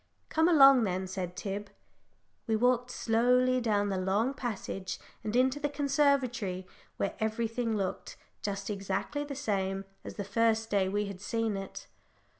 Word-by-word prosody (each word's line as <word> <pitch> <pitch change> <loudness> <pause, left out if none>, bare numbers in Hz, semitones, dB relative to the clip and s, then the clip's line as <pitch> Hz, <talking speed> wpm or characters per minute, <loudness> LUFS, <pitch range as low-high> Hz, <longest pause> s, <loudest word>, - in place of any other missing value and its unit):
"Come 320 +2 +3
along, 275 -6 +8
then," 190 -2 -1
said 185 -1 -4
Tib. 200 0 -4 0.8
We 220 - +2
walked 245 +2 +2
slowly 250 +2 +2
down 205 -3 +1
the 190 -1 -1
long 205 +8 +1
passage 200 -7 -4 0.3
and 215 +1 -3
into 260 +3 +3
the 290 0 -1
conservatory, 275 -10 +1 0.3
where 200 - -1
everything 225 +1 -1
looked 190 -2 -4 0.2
just 200 0 -3
exactly 195 +7 -2
the 285 -1 -6
same 195 -5 -1 0.2
as - - -8
the 200 - -3
first 225 +2 +1
day 195 -2 +2
we 205 +1 0
had 200 -2 -7
seen 225 0 -1
it. 195 0 -6
220 Hz, 150 wpm, -30 LUFS, 195-250 Hz, 0.8 s, along